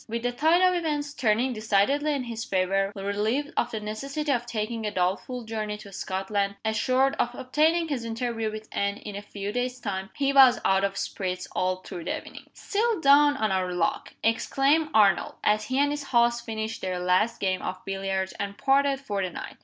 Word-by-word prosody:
With 230 +1 -3
the 245 - +1
tide 320 +8 +3
of 365 - +2
events 295 -4 -2
turning 245 0 +1
decidedly 220 +8 +1
in 275 -3 -2
his 230 -2 -5
favor 195 +1 0
relieved 210 +8 -1
of 240 - +1
the 220 - -4
necessity 275 +8 -3
of 240 -2 0
taking 225 0 -3
a 210 - 0
doubtful 205 +6 -1
journey 215 -2 -4
to 205 -1 -12
Scotland; 195 +2 -2
assured 255 +5 +2
of 245 0 0
obtaining 310 +6 +1
his 275 -6 -3
interview 230 -1 -2
with 215 0 -8
Anne 200 0 -1
in 210 -2 -8
a 200 - -5
few 205 0 -6
days' 250 +2 -2
time 190 -3 -4
he 275 -1 +1
was 265 -3 +7
out 190 0 +3
of 195 0 -1
spirits 185 -1 -3
all 185 0 0
through 170 - -7
the - - -1
evening. - - -12
"Still 435 0 0
down 290 0 +5
on 215 -4 0
our 185 -1 0
luck!" 175 -2 -1
exclaimed 275 +7 +2
Arnold, 200 -5 +3
as 215 +1 +2
he 260 - -2
and 285 +1 +3
his 295 -1 -4
host 235 -2 +2
finished 220 0 -4
their 185 -1 -2
last 185 +6 +1
game 190 -2 0
of 185 0 -5
billiards, 195 -1 -2
and 200 0 -4
parted 275 0 +2
for 205 -7 -3
the 185 - -1
night. - - -8
225 Hz, 200 wpm, -26 LUFS, 200-270 Hz, -, was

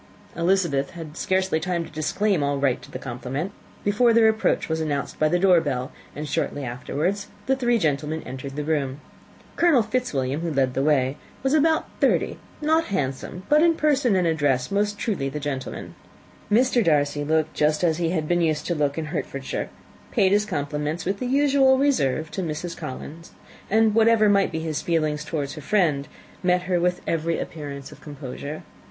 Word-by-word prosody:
Elizabeth 170 -5 +1
had 155 -2 -8
scarcely 185 -3 0
time 170 0 -2
to - - -13
disclaim 170 +4 0
all 140 0 0
right 135 -3 +1
to - - -13
the - - -6
compliment 130 +7 -4 0.3
before 230 +4 +3
their 225 -1 +6
approach 220 0 +1
was 160 0 -1
announced 145 -3 -3
by 155 - +3
the 175 - +2
door 180 -2 +5
bell, 130 -3 -3 0.2
and 150 +1 -5
shortly 145 0 -2
afterwards 150 +11 -2 0.2
the 265 - +2
three 240 -2 +2
gentlemen 155 -3 -1
entered 130 +2 -7
the 150 - -2
room. 145 -3 -1 0.6
Colonel 325 -9 +5
Fitzwilliam, 150 - -1
who 170 -1 -2
led 135 -3 +1
the 135 - 0
way, 135 -2 +2 0.3
was 270 +1 +1
about 315 +1 +3
thirty, - - +1 0.2
not 320 +2 +3
handsome, 150 0 -3
but 300 +1 +5
in 335 0 +4
person 280 -8 +2
and 180 -2 +2
address 145 -6 +1
most 205 +1 0
truly 190 - -1
the 150 +2 -5
gentleman. 140 -3 -5 0.6
Mr. 245 +2 +4
Darcy 145 -3 +2
looked 155 +1 +1
just 150 +2 +1
as 165 -1 +2
he 170 -1 +1
had 160 -3 -1
been 175 +1 +2
used 155 -2 0
to 175 - 0
look 145 -2 0
in 160 - -2
Hertfordshire, 140 -2 -4 0.4
paid 195 -5 +3
his 210 +1 +3
compliments, 150 -1 -3
with 195 +2 -1
his 250 - -2
usual 275 -1 +4
reserve, 160 - +1
to 190 - -3
Mrs. 170 +1 -4
Collins; 155 +2 -8 0.4
and 220 +1 +4
whatever 225 -1 +5
might 200 -1 +3
be 160 -1 -3
his 160 -2 -2
feelings 155 -3 0
towards 145 -3 -3
her 155 - -8
friend, 155 -6 +1 0.3
met 180 0 +2
her 180 -1 +1
with 180 +1 0
every 165 0 0
appearance 140 -3 -6
of - - -14
composure. 145 +1 -7
160 Hz, 185 wpm, -24 LUFS, 145-205 Hz, 0.6 s, their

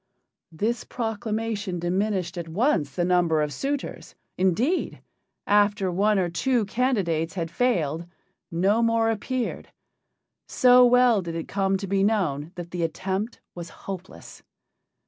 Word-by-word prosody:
This 220 +8 -2
proclamation 225 -4 -3
diminished 180 0 -1
at 170 -2 -5
once 180 - 0
the 175 - +1
number 175 -3 +2
of 150 -1 -1
suitors. 280 0 -4 0.2
Indeed, 220 - 0 0.5
after 205 -2 +2
one 205 +4 +2
or 185 -2 +1
two 230 +7 0
candidates 195 -9 0
had 165 -2 -3
failed, 170 - 0 0.4
no 195 +6 +2
more 230 -1 +2
appeared 245 +3 -3 0.8
so 250 0 +6
well 245 -3 +5
did 170 -2 -6
it 165 - -4
come 195 -1 0
to 195 - -5
be 195 0 +1
known 170 -8 0
that 175 -1 -7
the 180 - -3
attempt 190 +7 -3
was 170 -1 -8
hopeless. 190 +1 -9
195 Hz, 130 wpm, -25 LUFS, 170-225 Hz, 0.8 s, so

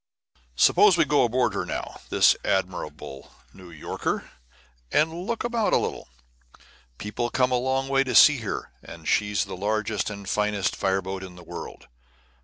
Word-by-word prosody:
Suppose 185 - +5
we 165 - +4
go 145 -2 +3
aboard 125 +1 +1
her - - -2
now, - - -5
this - - +5
admirable 75 -7 -3 0.2
New 90 -2 -13
Yorker, 80 -3 -4 0.6
and 155 +2 +2
look 235 -1 -2
about 235 -3 0
a - - +6
little. - - -4 0.9
People 105 +3 -3
come 125 +1 +1
a 125 - +2
long 130 +1 -1
way 135 0 +2
to 130 - -2
see 150 -3 +8
her, 110 - -5
for - - -11
she's 105 -2 +1
the 95 - -7
largest 105 +1 -1
and 100 -2 -8
finest 105 -1 0
fire 95 0 0
boat 95 0 -5
in 90 -2 -10
the 90 - -13
world. - - -9
105 Hz, 165 wpm, -25 LUFS, 95-135 Hz, 0.9 s, see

